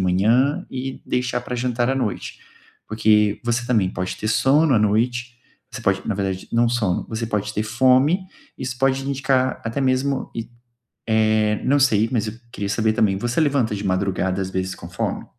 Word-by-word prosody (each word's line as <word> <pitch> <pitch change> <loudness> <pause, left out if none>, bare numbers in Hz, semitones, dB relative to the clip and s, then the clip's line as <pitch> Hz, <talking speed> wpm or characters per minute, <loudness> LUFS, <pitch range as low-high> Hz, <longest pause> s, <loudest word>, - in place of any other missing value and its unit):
manhã 110 +10 +2
e 130 0 -5
deixar 125 0 -1
para 125 +1 -6
jantar 120 0 0
à - - +1
noite. 120 -7 -3 0.5
Porque 105 -1 +2
você 120 0 -1
também 110 -7 +2
pode 95 0 -4
ter 110 - -3
sono 135 +6 +3
à - - +5
noite, 120 +3 0 0.3
você - - -7
pode 95 -1 +1
na 110 - 0
verdade, 95 -1 -3
não 120 0 +3
sono, 110 -7 0
você 115 0 -3
pode 105 -1 -2
ter 105 - 0
fome, 130 - +3 0.3
isso 130 0 -4
pode 135 0 +2
indicar 135 -1 0
até 115 +4 -2
mesmo 130 +1 0
e, 115 0 -5 0.6
eh, 110 -1 +2
não 140 +2 +3
sei, 115 -5 +3
mas 110 -3 0
eu 105 - -4 0.2
queria 100 -3 -4
saber, 110 +1 +1
também, 100 -3 +2
você 120 +6 -1
levanta 140 -8 +1
de 100 - -5
madrugada, 95 0 0
às 95 - -3
vezes, 95 0 -2
com 85 - -10
fome? 90 - -3
115 Hz, 185 wpm, -22 LUFS, 105-130 Hz, 0.6 s, à